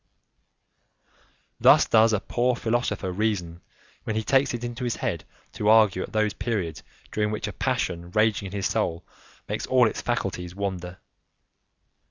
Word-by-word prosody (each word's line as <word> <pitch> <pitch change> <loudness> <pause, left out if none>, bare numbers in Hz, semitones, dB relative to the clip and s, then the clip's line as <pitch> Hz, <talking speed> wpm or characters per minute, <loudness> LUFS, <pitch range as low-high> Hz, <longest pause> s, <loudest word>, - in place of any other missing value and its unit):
Thus - - +6
does 110 0 +5
a 110 - +1
poor 125 +4 0
philosopher 115 -5 -1
reason 90 -4 -2 0.4
when 110 - -3
he 110 - -1
takes 135 +3 +3
it 120 -1 -5
into 120 +1 -5
his 120 -2 -1
head - - -3 0.3
to 105 - 0
argue 110 -4 +5
at - - -6
those 110 -1 +1
periods 105 -9 -3 0.3
during 105 0 0
which 105 0 -3
a 105 - -5
passion 85 0 -2
raging 110 0 +1
in - - -9
his 100 -1 -3
soul 85 0 -1 0.4
makes - - -3
all 125 -2 +5
its - - -4
faculties 90 -7 -3
wander. 90 -3 -4
105 Hz, 155 wpm, -25 LUFS, 95-115 Hz, 0.4 s, Thus